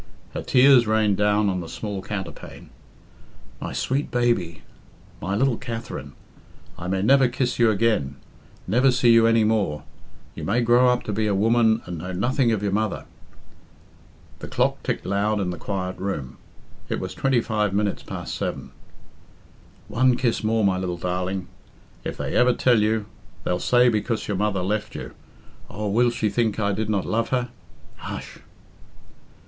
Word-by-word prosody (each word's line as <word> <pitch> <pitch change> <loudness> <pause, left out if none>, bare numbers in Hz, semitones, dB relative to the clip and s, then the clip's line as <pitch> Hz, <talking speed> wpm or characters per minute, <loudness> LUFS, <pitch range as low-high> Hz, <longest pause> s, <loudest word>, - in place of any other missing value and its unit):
Her - - -3
tears 130 -2 +5
rained 110 -2 +2
down 105 0 +2
on 95 -2 0
the 85 -2 -7
small 105 -3 -5
counterpane. 95 -3 -7 0.9
"My - - -5
sweet 135 +3 -1
baby 120 -10 0 0.6
I - - -6
my 95 - 0
little 130 +2 +2
Katherine! 115 - -6 0.6
I 90 - -7
may 95 +1 0
never 135 +3 +5
kiss 125 0 -2
you 115 -1 +5
again 105 -10 +1 0.5
never 125 +8 +3
see 125 -2 +4
you 115 0 +6
any 115 -1 +4
more' 105 -9 0 0.5
you - - -8
may 115 +5 +1
grow 120 +2 +4
up 125 0 +1
to 105 - -4
be 105 +1 0
a 100 - +1
woman 115 +2 +3
and 85 -2 -6
know 90 +3 -6
nothing 120 +6 +1
of 105 -2 -1
your 100 - 0
mother!" 105 0 -1 1.3
The - - -7
clock - - 0
ticked - - -3
loud 105 +2 0
in 90 -2 -1
the 90 - -6
quiet 95 -1 -4
room 75 -10 -4 0.5
it - - -1
was - - -5
twenty 135 -2 +1
five 105 -3 0
minutes 100 0 -1
past - - -6
seven. - - -4 1.2
"One 125 +1 +2
kiss 120 -4 0
more, 110 0 +1
my 95 -1 +2
little 90 -2 -3
darling. 90 +1 -3 0.6
If - - -5
they - - -3
ever 125 0 +4
tell 120 -3 +3
you... 110 0 +1 0.4
they'll 90 - -1
say 125 0 +4
because 115 0 0
your 105 - -1
mother 100 -2 0
left 105 +3 -2
you... - - -7 0.6
Oh, 105 +2 -4
will 120 +4 +3
she 115 -2 -1
think 110 0 0
I 100 -1 +1
did 105 +2 -2
not 100 -3 0
love 115 +1 -1
her? 125 -1 0 0.5
Hush!" - - -7
110 Hz, 170 wpm, -24 LUFS, 95-120 Hz, 1.3 s, you